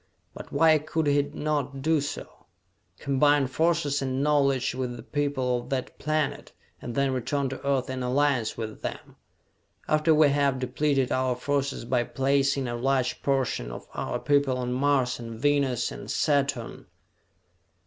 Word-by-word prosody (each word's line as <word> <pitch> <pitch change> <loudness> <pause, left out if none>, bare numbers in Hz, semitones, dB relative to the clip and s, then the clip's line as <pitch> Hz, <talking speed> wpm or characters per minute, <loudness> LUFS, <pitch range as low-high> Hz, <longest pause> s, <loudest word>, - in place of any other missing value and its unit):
But - - -10
why 160 -1 +5
could 155 +1 -2
he 145 0 +3
not 145 -1 -3
do 160 -1 +2
so, 145 - -7 0.5
combine 140 +1 +3
forces 150 +1 +1
and 130 0 -1
knowledge 140 -3 +2
with 125 -1 -3
the 115 - -10
people 135 -3 -1
of 120 - -10
that 130 -2 -3
planet 155 -1 -1 0.3
and 120 - -6
then 140 -1 +1
return 135 +2 -1
to 135 - -7
Earth 135 -2 0
in 130 -1 -4
alliance 130 -2 +1
with 110 -2 -6
them? - - -7 0.7
after 155 +1 +3
we 155 -1 +6
have 140 -1 +2
depleted 130 +1 0
our 130 -1 +1
forces 140 0 -2
by 120 0 +1
placing 135 +2 +1
a 120 - -3
large 130 +1 0
portion 135 - 0
of - - -9
our - - -3
people 140 -3 +2
on 125 0 -2
Mars 130 -2 +1
and 115 -1 -7
Venus 140 -2 +1
and - - -8
Saturn?" 140 -5 0
135 Hz, 155 wpm, -26 LUFS, 125-145 Hz, 0.7 s, we